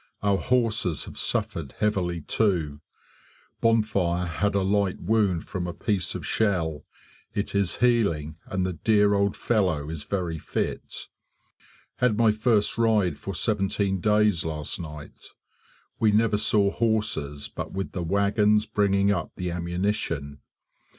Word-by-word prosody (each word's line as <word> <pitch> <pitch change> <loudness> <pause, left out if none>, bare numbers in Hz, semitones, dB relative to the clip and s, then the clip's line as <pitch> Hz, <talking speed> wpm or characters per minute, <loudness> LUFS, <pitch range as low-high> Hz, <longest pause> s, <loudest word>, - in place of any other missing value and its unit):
Our 100 -1 +2
horses 110 - +1
have - - -10
suffered 75 -6 -1
heavily 90 -5 -1
too. 80 -8 0 0.8
Bonfire 100 -6 +1
had 100 +4 -1
a 100 - +2
light 100 -1 +1
wound 100 -3 +1
from 90 -2 -3
a 85 - -5
piece 100 -5 -1
of - - -5
shell; 85 -8 0 0.5
it 100 - -2
is 100 -3 +1
healing 100 -11 +1
and 95 0 -1
the 95 - -2
dear 105 +5 +3
old 100 0 +1
fellow 90 -10 0
is 75 -3 -4
very 85 -4 -2
fit. - - -4 0.9
Had 125 -5 +2
my 115 -1 +5
first 110 0 +1
ride 105 -8 +2
for 100 - -5
seventeen 100 0 0
days 105 -4 +3
last 75 -1 -3
night. 75 -3 -10 0.7
We 110 -1 +4
never 110 0 +3
saw 105 -1 +3
horses 100 -11 -1
but - - -6
with 95 0 -4
the 90 - -4
wagons 105 +4 +2
bringing 100 -2 +2
up 85 -5 -2
the 90 -1 -3
ammunition. 85 -4 -2
100 Hz, 135 wpm, -26 LUFS, 85-105 Hz, 0.9 s, my